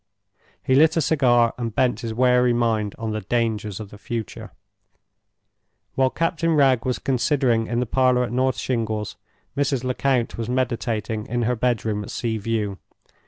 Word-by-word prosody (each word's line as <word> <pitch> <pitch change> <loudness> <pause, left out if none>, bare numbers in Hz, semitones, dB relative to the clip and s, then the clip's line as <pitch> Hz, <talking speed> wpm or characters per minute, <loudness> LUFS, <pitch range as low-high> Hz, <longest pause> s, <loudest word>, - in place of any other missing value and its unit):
He 130 - +1
lit 160 +4 +5
a - - +4
cigar, 120 -6 +3
and 115 -3 -4
bent 125 -4 +1
his 115 -2 -4
wary 125 +1 +3
mind 110 -3 0
on 110 -1 -3
the 110 0 -3
dangers 110 -2 -1
of 105 -2 -8
the 105 - -12
future. 115 -1 -6 1.4
While 130 -1 +2
Captain 165 +2 0
Wragge 135 -4 +3
was 125 -1 0
considering 130 -3 +1
in 120 +1 -1
the 125 - 0
parlor 125 +1 +2
at 120 - -4
North 130 0 +1
Shingles, 110 -4 -2 0.4
Mrs. 140 -3 0
Lecount 125 -2 0
was 115 0 -3
meditating 115 -4 -2
in 120 +1 -1
her 125 +2 +1
bedroom 110 -3 -1
at 105 - -8
Sea 115 -2 -2
View. 105 -3 -2
120 Hz, 165 wpm, -23 LUFS, 110-130 Hz, 1.4 s, lit